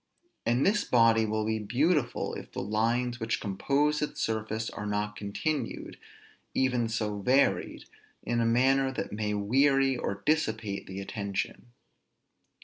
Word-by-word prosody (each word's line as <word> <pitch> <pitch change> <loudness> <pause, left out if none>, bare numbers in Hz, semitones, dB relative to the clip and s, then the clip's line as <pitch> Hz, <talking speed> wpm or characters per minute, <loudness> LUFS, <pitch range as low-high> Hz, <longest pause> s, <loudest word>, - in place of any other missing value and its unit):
And 120 +3 +3
this 205 +1 +3
body 115 -2 +4
will 110 0 -1
be 110 0 0
beautiful 130 - 0
if - - -8
the - - -4
lines 115 +4 0
which 115 0 -1
compose 140 +10 0
its 150 - -3
surface 110 0 -2
are 105 - -5
not 105 0 -2
continued, 115 +7 -3 0.6
even 125 -3 +1
so 105 -2 -2
varied, 130 +7 +2 0.4
in 120 0 0
a - - +2
manner 130 +3 +3
that - - -4
may 105 0 -2
weary 135 +6 +3
or 100 -5 -4
dissipate 110 -10 0
the 95 +1 -6
attention. 100 +2 -4
115 Hz, 140 wpm, -29 LUFS, 105-135 Hz, 0.6 s, body